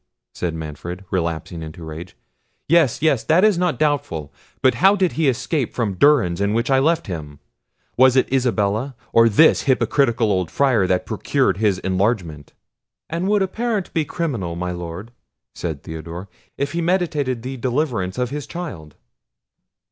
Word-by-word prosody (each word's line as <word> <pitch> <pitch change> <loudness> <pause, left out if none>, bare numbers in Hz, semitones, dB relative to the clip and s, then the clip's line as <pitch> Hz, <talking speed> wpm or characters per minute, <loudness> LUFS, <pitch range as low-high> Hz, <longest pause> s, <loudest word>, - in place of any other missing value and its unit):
said 85 -2 -3
Manfred, 80 +4 -7
relapsing 85 -2 -2
into 80 +1 -8
rage; 80 +3 -9 0.5
"yes, 155 -5 +3
yes, 140 -7 +3
that 170 +4 +4
is 215 -2 +5
not 175 -1 0
doubtful—. 135 - -1 0.3
But 130 - +5
how 195 +2 +6
did 185 -3 +1
he 160 -2 0
escape 130 +2 -2
from 110 -5 -1
durance 100 -6 +3
in 100 +1 +1
which 115 +4 0
I 135 - +5
left 165 +4 +2
him? 75 -6 -6 0.6
Was 130 0 +6
it 130 0 +2
Isabella, 120 0 0 0.2
or 115 0 +6
this 155 +10 +4
hypocritical 125 -4 +2
old 95 -4 0
Friar, 120 - +2
that 90 0 0
procured - - 0
his 105 -3 +2
enlargement?" 95 - -2 0.6
"And 170 +3 -1
would 205 -1 +3
a - - 0
parent 220 -1 -2
be 160 - +1
criminal, 125 - -3
my 90 +1 -3
Lord," 90 +5 -7 0.4
said 80 -5 -5
Theodore, 85 +4 -7 0.3
"if 140 +1 -2
he 170 +2 -2
meditated 150 -9 0
the 130 +1 -5
deliverance 120 -7 -1
of 125 0 -1
his 145 0 -5
child?" 95 - -7
120 Hz, 160 wpm, -21 LUFS, 90-150 Hz, 0.6 s, how